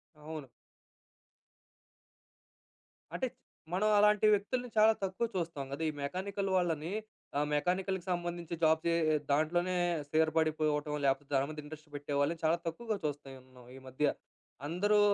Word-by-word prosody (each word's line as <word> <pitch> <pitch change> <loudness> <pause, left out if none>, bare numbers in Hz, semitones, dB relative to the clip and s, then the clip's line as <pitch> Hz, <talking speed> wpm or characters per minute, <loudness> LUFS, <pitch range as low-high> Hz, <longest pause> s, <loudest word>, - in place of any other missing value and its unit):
అవును. 150 -1 -7 2.7
అంటే, - - 0 0.5
మనం 205 +4 +2
అలాంటి 210 0 +5
వ్యక్తుల్ని 245 +5 -1
చాలా 215 +1 +7
తక్కువ 190 +4 0
చూస్తాం 165 -6 -2
కదా! 140 +3 -4
ఈ - - -1
మెకానికల్ 195 +6 -2
వాళ్ళని 165 -2 0 0.5
ఆ - - +3
మెకానికల్‌కి 185 +4 0
సంబంధించి 175 -1 -3
జాబ్ 160 0 +5
చే 170 - +3 0.4
దాంట్లోనే 175 +5 +2 0.3
స్థిరపడిపోవటం. 155 -1 +1
లేకపోతే 135 +1 +1
దాని 135 0 +3
మీద 155 0 -6
ఇంట్రెస్ట్ 155 +1 -11
పెట్టే 145 0 -4
వాళ్ళని 150 +4 +1
చాలా 160 +2 +3
తక్కువగా 215 +6 -2
చూస్తున్నాం 130 -3 -7
ఈ - - -11
ఈ - - -10
మధ్య. 130 +3 0 0.6
అందరూ 205 +6 +3
160 Hz, 125 wpm, -33 LUFS, 150-185 Hz, 2.7 s, చాలా